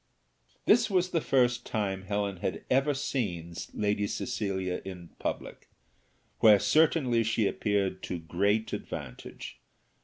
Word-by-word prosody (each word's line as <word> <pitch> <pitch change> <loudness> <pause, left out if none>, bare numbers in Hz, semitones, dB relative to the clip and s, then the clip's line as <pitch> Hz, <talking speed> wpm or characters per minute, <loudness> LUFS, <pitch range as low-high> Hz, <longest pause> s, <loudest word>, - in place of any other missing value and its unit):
This 230 +1 +5
was 185 -2 +1
the 165 - +1
first 125 -3 +2
time 95 -3 -2
Helen 100 -1 -1
had 95 - -4
ever 135 +3 +3
seen 90 -12 -2 0.2
Lady 105 0 0
Cecilia 95 -6 -2
in 90 -3 -8
public, - - -5 0.7
where 105 -2 +8
certainly 145 -3 +3
she 110 -1 +1
appeared 100 -2 0
to 90 - -4
great 100 +7 0
advantage. 65 -3 -7
105 Hz, 120 wpm, -29 LUFS, 95-125 Hz, 0.7 s, where